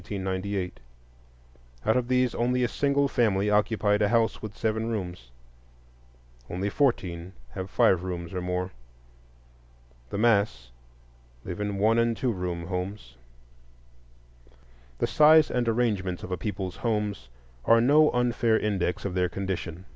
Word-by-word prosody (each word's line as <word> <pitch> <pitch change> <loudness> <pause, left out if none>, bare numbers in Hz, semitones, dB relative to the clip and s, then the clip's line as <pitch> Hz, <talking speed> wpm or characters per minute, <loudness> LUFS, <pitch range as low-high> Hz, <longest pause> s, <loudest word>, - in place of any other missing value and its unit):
Out - - -19 1.8
of 110 - +3
all 125 - +3
these, 125 -1 +2
only 125 +1 +1
a - - +3
single 140 +2 +1
family 105 -5 +1
occupied 105 0 +2
a 105 - +3
house 115 -1 +1
with 110 -1 -8
seven 110 0 -1
rooms; 90 - -5 1.2
only 95 +3 -2
fourteen 95 -10 -1 0.2
have 95 +7 -6
five 90 -1 +3
rooms 90 -1 -5
or 90 - -3
more. 90 +1 -2 1.4
The - - -4
mass 100 - +1 0.7
live 90 - -5
in 105 -1 -2
one 110 +3 +3
and 115 -1 +1
two 125 - 0
room 90 -4 -4
homes. 90 - -5 1.8
The - - +1
size 155 0 +5
and 120 -2 0
arrangements 105 -6 -1
of 95 - -7
a - - +1
people's 95 -1 -5
homes 105 - -2 0.4
are 115 - +6
no 150 +6 +5
unfair 120 -2 +1
index 100 -5 -1
of 100 - -2
their 90 -1 +1
condition. 95 -2 -5
105 Hz, 135 wpm, -27 LUFS, 90-115 Hz, 1.8 s, are